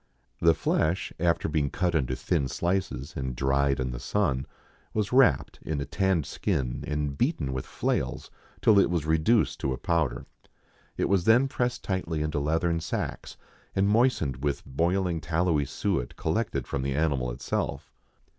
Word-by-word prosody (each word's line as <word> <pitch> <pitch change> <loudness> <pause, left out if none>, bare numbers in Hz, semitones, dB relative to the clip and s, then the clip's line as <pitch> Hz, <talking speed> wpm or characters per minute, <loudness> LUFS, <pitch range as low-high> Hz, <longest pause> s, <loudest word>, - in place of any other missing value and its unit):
The 85 -1 +5
flesh, 85 +5 0
after 85 0 +1
being 75 -2 0
cut 90 +2 0
into 65 -5 0
thin 65 +2 0
sHces 85 -3 -2
and 65 -2 -3
dried 70 +1 +1
in 65 -1 -1
the - - -5
sun, 70 -10 0 0.5
was 105 +1 0
wrapped 135 0 +4
in 75 -2 -3
a 70 - -2
tanned 95 -4 +1
skin^ 65 -2 -2
and 75 -2 -1
beaten 80 - 0
with 65 - -4
flails - - -2 0.3
till 105 -2 +6
it 100 - +4
was 85 -3 -1
reduced 80 +9 +2
to 65 - -1
a - - -4
powder. 80 -6 0 0.7
It - - +1
was 95 -3 +2
then 120 +5 +5
pressed 125 -2 -2
tightly 85 -5 -2
into 75 -1 -1
leathern 80 +3 +1
sacks, 80 - -4 0.4
and 95 +1 +3
moistened 100 - +2
with 70 -1 -1
boiling 85 +4 0
tallowy 80 -3 +1
suet 85 -10 -2
collected - - -1
from 70 - -3
the 70 0 -1
animal 70 -5 +1
itself. 65 +3 -3
80 Hz, 160 wpm, -27 LUFS, 70-95 Hz, 0.7 s, till